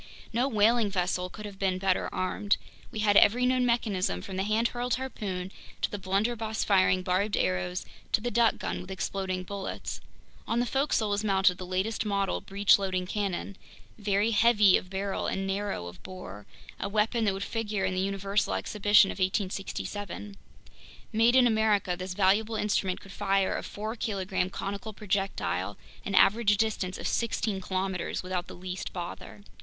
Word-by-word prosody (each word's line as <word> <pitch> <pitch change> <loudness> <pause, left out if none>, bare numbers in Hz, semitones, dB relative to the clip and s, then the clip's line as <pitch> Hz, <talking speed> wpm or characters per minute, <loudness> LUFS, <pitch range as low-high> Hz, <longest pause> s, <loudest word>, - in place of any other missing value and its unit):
No 245 +4 +2
whaling 225 -2 +3
vessel 180 -1 -1
could 210 +3 -9
have 200 -2 -9
been 190 -2 +1
better 185 0 +1
armed. 185 +2 0 0.3
We 215 - -4
had 205 -1 +3
every 245 +4 +5
known 255 0 +2
mechanism, 195 - 0
from 190 - -6
the 190 - 0
hand 215 +4 +1
hurled 245 0 -1
harpoon, 195 -8 -4 0.3
to - - +1
the 205 - -4
blunderbuss 220 +3 -1
firing 185 -2 +3
barbed 190 +3 +1
arrows, 90 -1 -1 0.3
to - - +5
the 240 +3 -3
duck 235 -1 +3
gun - - -3
with 180 - -11
exploding 190 -1 -2
bullets. 195 +1 -5 0.5
On 230 - +1
the 245 - +2
forecastle 265 -5 +1
was 205 +1 0
mounted 190 -3 +3
the 185 - -6
latest 190 +5 -1
model 200 -2 0
breech 200 +1 +4
loading 185 -2 -1
cannon, 200 0 -3 0.4
very 205 +1 +1
heavy 215 -3 +5
of 185 - -1
barrel 195 +1 -2
and 195 - -2
narrow 195 - -2
of 90 0 -10
bore, 105 - -9 0.3
a - - -2
weapon 220 +3 +1
that 200 - +2
would 195 - -3
figure 210 -3 -2
in 185 - 0
the 185 - 0
Universal 195 +1 0
Exhibition 205 -1 +4
of - - -8
1867. 195 +1 -3 0.8
Made 230 +3 +4
in 255 -1 +7
America, 220 -5 +2
this 185 +1 -5
valuable 210 +3 +3
instrument 200 -3 0
could 195 - -13
fire 195 -1 +1
a - - -2
four 215 +2 -5
kilogram 190 -4 -1
conical 200 +3 -5
projectile 195 - -2 0.3
an 195 - -2
average 210 +1 +5
distance 200 -4 -1
of - - -3
sixteen 215 -3 -1
kilometers 185 -1 -2
without 180 -1 -3
the - - -9
least 180 0 -5
bother. 180 +3 -7
200 Hz, 170 wpm, -28 LUFS, 185-215 Hz, 0.8 s, in